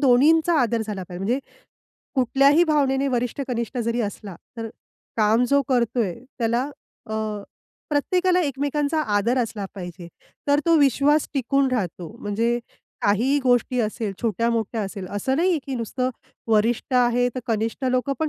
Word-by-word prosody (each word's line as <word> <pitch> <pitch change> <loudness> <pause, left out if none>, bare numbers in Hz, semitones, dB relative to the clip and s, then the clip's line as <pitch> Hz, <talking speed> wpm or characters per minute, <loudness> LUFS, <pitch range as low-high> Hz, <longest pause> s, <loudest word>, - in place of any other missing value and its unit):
दोन्हींचा 305 +5 +4
आदर 235 -1 0
झाला 205 -3 -4
पाहिजे. 180 +1 -6
म्हणजे 245 +6 +1 0.8
कुठल्याही 275 +5 +4
भावनेने 280 -3 +2
वरिष्ठ-कनिष्ठ 245 0 -3
जरी 235 0 0
असला, 200 -3 -10 0.2
तर 225 0 -4 0.5
काम 220 +2 +3
जो 280 0 +4
करतोय 235 -6 +1 0.2
त्याला 235 +1 +1 0.4
अ, 220 - -7 0.8
प्रत्येकाला 360 +5 +2
एकमेकांचा 290 +1 0 0.2
आदर 235 +5 +1
असला 220 -4 -2
पाहिजे. 175 -2 -8 0.4
तर 285 +1 +4
तो 335 -1 +5
विश्वास 285 +2 +3
टिकून 275 +1 +2
राहतो 185 -3 -3
म्हणजे 230 +3 0 0.4
काहीही 240 +8 +3
गोष्टी 250 0 +2
असेल, 215 -1 -2
छोट्या-मोठ्या 230 0 0
असेल 195 -1 -5
असं 205 +7 -1
नाहीये, 345 0 +2
की 270 - -3
नुसतं 250 +3 -2 0.4
वरिष्ठ 225 +5 +1
आहे 245 0 +3
तर 255 - -3
कनिष्ठ 225 +2 -1
लोकं 255 +2 +1
पण 315 - +1
245 Hz, 140 wpm, -23 LUFS, 220-275 Hz, 0.8 s, तो